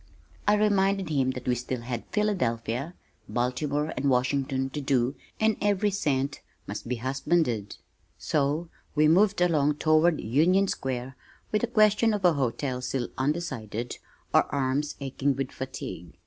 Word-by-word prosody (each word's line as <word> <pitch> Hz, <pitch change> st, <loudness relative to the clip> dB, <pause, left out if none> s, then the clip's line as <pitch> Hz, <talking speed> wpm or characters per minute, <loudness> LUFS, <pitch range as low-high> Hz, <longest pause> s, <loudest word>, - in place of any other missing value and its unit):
I 210 Hz, -, +6 dB
reminded 200 Hz, -3 st, +2 dB
him 135 Hz, -4 st, +1 dB
that 125 Hz, -1 st, -8 dB
we 125 Hz, -, +3 dB
still 125 Hz, 0 st, -3 dB
had 120 Hz, -1 st, -5 dB
Philadelphia, 140 Hz, -, -1 dB, 0.3 s
Baltimore 145 Hz, +5 st, -1 dB
and 140 Hz, -, 0 dB
Washington 135 Hz, +1 st, 0 dB
to 150 Hz, -, -4 dB
"do" 135 Hz, -2 st, +1 dB, 0.3 s
and 220 Hz, -1 st, +2 dB
every 205 Hz, 0 st, +2 dB
cent 145 Hz, -7 st, -1 dB, 0.2 s
must 105 Hz, +3 st, -6 dB
be 125 Hz, -, -1 dB
husbanded 130 Hz, -3 st, 0 dB, 0.4 s
so 150 Hz, +3 st, 0 dB, 0.3 s
we 150 Hz, 0 st, +5 dB
moved 195 Hz, +4 st, +4 dB
along 150 Hz, -4 st, +3 dB
toward 155 Hz, +2 st, +3 dB
Union 170 Hz, -, +3 dB
Square 130 Hz, -4 st, -3 dB, 0.4 s
with 210 Hz, -, +1 dB
the 240 Hz, -, +1 dB
question 215 Hz, -1 st, +4 dB
of 195 Hz, -3 st, -2 dB
a 175 Hz, -, +6 dB
hotel 130 Hz, -1 st, -1 dB
still 125 Hz, -1 st, -2 dB
undecided, 130 Hz, -6 st, -3 dB, 0.3 s
our -, -, +5 dB
arms 140 Hz, +2 st, -1 dB
aching 135 Hz, 0 st, 0 dB
with 135 Hz, 0 st, -3 dB
fatigue. 130 Hz, -10 st, -7 dB
140 Hz, 145 wpm, -27 LUFS, 125-175 Hz, 0.4 s, I